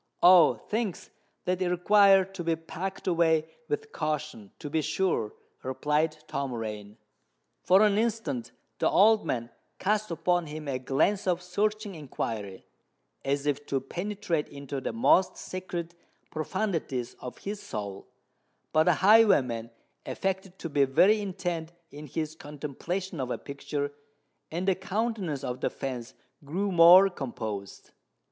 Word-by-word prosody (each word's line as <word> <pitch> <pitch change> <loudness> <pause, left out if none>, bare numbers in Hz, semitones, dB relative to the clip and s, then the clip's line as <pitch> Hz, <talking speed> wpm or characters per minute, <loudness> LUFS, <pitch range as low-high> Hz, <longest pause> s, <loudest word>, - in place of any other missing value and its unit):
"Oh! 175 -3 +8
things 215 -4 -4 0.3
that 180 0 0
require 195 +2 +5
to 195 -2 -7
be 165 0 +1
packed 175 +4 -6
away 165 -3 +2 0.2
with 440 0 -3
caution, 150 -9 -3
to - - -7
be 160 +2 0
sure," 160 - 0 0.3
replied 150 +4 0
Tom 140 -2 -3
Rain. 105 -3 -6 0.6
For 190 +3 +5
an 210 -1 +3
instant 170 - -2 0.3
the - - +3
old 215 +2 +5
man 120 -1 -2 0.3
cast 210 +2 0
upon 175 0 0
him 150 0 -7
a 130 -2 -1
glance 155 +11 +1
of 180 -1 +1
searching 210 +3 -1
inquiry, 115 - -5 0.6
as 140 +1 -1
if 145 0 0
to 135 - 0
penetrate 175 +2 -3
into 140 -1 -6
the - - -2
most 190 -5 +3
secret 175 -2 -5 0.4
profundities 155 - -2
of 125 - -8
his 205 +1 -6
soul; 100 -3 -6 0.7
but 155 0 +4
the 180 - +4
highwayman 140 - +5 0.4
affected 190 -1 -3
to - - -5
be 145 -1 +3
very 195 +11 +4
intent 175 -4 -4 0.2
in 150 +1 -9
his 155 +3 -3
contemplation 155 +4 -5
of 130 -1 -2
a - - -2
picture, 145 0 -4 0.6
and 175 +4 -3
the 190 - +5
countenance 190 - -2
of 125 -1 -4
the - - +1
fence 130 -2 -6 0.3
grew 190 +8 -2
more 175 +3 +9
composed. 110 - -6
165 Hz, 140 wpm, -28 LUFS, 140-190 Hz, 0.7 s, more